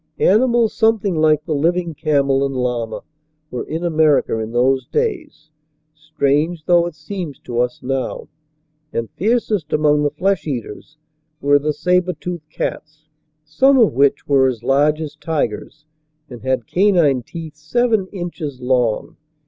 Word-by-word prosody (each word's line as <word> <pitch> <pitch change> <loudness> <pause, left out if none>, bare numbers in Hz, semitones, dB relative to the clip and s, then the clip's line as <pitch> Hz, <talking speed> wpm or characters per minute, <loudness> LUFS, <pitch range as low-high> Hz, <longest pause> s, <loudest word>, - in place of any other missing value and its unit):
Animals 235 +2 +3
something 220 -4 +2
like 155 -1 +2
the 160 - -2
living 170 +3 0
camel 140 -3 +1
and 135 -1 -2
llama 125 -3 -2 0.5
were 125 - -3
in 160 +2 -4
America 155 -8 +2
in 110 0 -4
those 130 +2 +1
days, 335 - -3 0.4
strange 150 +1 -1
though 175 -1 +4
it 170 - -8
seems 155 -2 -6
to 120 -1 -4
us 125 0 -1
now. 135 0 -3 0.6
And 115 -1 -3
fiercest 210 -5 -1
among 150 -1 +3
the 145 - +2
flesh 180 +3 -1
eaters 135 +2 -6 0.4
were 145 +1 +3
the 150 +2 -1
saber 180 +4 +1
toothed 175 -4 -7
cats, 155 0 -6 0.4
some 265 - +3
of 230 -5 +4
which 140 +2 +2
were 135 -2 +4
as 120 -3 -3
large 145 +4 +2
as 155 -2 -6
tigers 150 -1 -3 0.5
and 120 -2 -9
had 130 -1 -1
canine 175 - +3
teeth 160 +4 -9
seven 215 +6 0
inches 175 -8 -6
long. 125 -3 0
155 Hz, 145 wpm, -19 LUFS, 135-175 Hz, 0.6 s, though